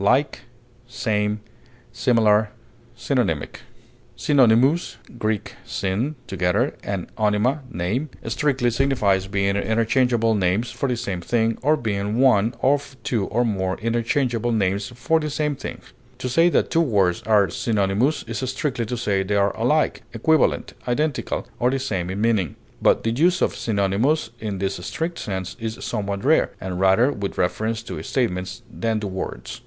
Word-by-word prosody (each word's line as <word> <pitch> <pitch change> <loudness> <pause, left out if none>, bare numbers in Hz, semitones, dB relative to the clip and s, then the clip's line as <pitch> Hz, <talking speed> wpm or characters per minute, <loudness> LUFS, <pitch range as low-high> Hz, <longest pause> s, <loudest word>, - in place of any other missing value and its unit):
corresponding, 120 -3 -1 0.5
interchangeable, 115 - 0 0.6
Synonymous 135 +3 +3 0.2
(Gr. 110 -1 +2 0.3
syn, 105 +11 -2
together, 90 -2 0
and 100 -3 -3
onyma, 110 +6 +2
name) 110 - -2 0.2
strictly 125 +1 +1
signifies 110 -7 +1
being 100 0 0
interchangeable 115 +2 +2
names 100 +4 +1
for 140 - -2
the 125 - 0
same 100 -7 -3
thing, 115 +3 +1
or 150 +4 +3
being 105 -2 -2
one 120 -3 +4
of 140 0 +1
two 110 -6 0
or 120 +4 +1
more 95 -4 -1
interchangeable 120 +1 0
names 100 -2 0
for 145 +7 0
the 150 -1 -3
same 150 0 -1
thing; - - -7 0.4
to - - -4
say 165 +7 +4
that - - +1
two 165 - +3
words 100 - +2
are 100 -5 +4
synonymous 105 - +1
is - - -5
strictly 130 -3 -2
to 125 - -3
say 100 -4 0
they 100 +2 -1
are 100 0 +2
alike, 150 +7 +1
equivalent, 160 +8 +2
identical, 145 +3 -1
or 125 - +3
the 135 - 0
same 95 -10 -2
in 95 +2 -3
meaning; 110 -7 +1 0.3
but - - +3
the 115 - +1
use 175 +9 +3
of - - +1
synonymous 110 +7 0
in 105 -3 -4
this 95 +1 -2
strict 165 - -3
sense 95 -2 -4
is 110 0 -4
somewhat 100 -1 -3
rare, 160 +3 +4
and 90 -1 -4
rather 95 +8 +4
with 100 -6 -4
reference 110 +5 -1
to - - -6
statements 95 -6 -2
than 115 -1 -1
to 105 - -4
words. 95 -10 -5
115 Hz, 150 wpm, -23 LUFS, 100-130 Hz, 0.6 s, one